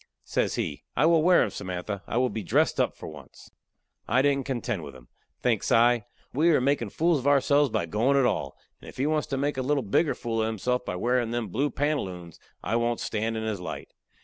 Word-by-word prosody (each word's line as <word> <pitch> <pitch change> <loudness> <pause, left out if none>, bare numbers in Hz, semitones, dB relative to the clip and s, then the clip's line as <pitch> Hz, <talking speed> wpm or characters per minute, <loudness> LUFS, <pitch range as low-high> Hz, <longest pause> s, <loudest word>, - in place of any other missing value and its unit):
Says - - -1
he: - - -3
"I 140 - +4
will 165 -1 +5
wear 180 +2 +5
'em, - - -2
Samantha. 95 +1 -5
I 115 - -2
will 125 0 +2
be 110 - -4
dressed 90 - +1
up - - +1
for - - -9
once." 75 -4 -13 0.6
I 125 +4 +3
didn't 140 -2 +1
contend 120 -7 -2
with - - -9
him. - - -16 0.3
Thinks - - +1
I: 120 0 +4 0.3
we 155 +6 +3
are 155 - +4
makin' 130 -4 0
fools 165 - +1
of 130 - -3
ourselves 145 0 +4
by 85 - -1
goin' 115 +10 +1
at 135 - +4
all, - - -1 0.2
and - - -12
if - - -14
he 130 - 0
wants 155 0 0
to 135 - -2
make 145 +1 -1
a - - 0
little 140 +1 0
bigger 140 +9 +1
fool 115 -2 -2
of 110 - +1
himself 125 +3 -1
by 90 - -4
wearin' 120 +4 0
them 120 -3 -2
blue 135 +10 0
pantaloons, 95 - -3 0.2
I 115 - 0
won't 120 0 0
stand 110 +1 -2
in 110 - -3
his 110 -4 -3
light. - - -6
120 Hz, 230 wpm, -27 LUFS, 110-140 Hz, 0.6 s, will